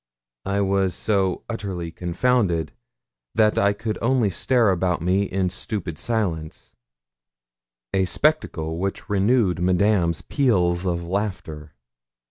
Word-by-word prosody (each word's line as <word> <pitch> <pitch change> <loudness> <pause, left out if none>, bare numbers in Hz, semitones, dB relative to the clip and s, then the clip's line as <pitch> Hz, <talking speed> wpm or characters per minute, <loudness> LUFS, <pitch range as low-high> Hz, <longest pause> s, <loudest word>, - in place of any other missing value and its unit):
I 100 +1 +1
was 95 -2 +1
so 95 -4 0
utterly 95 -7 -4
confounded 90 - 0 0.6
that 110 -1 +3
I 100 - +4
could 110 +1 -4
only 120 -4 +2
stare 115 +4 +2
about 90 -1 0
me 95 +4 +1
in 95 -1 -1
stupid 90 -4 -5
silence, 85 -9 -3 1.2
a 95 -1 +2
spectacle 90 - 0
which 95 +3 -3
renewed 100 -2 +2
Madame's 90 -2 +2
peals 95 -10 +1
of 85 -1 -1
laughter. 90 -5 -4
95 Hz, 110 wpm, -23 LUFS, 85-105 Hz, 1.2 s, I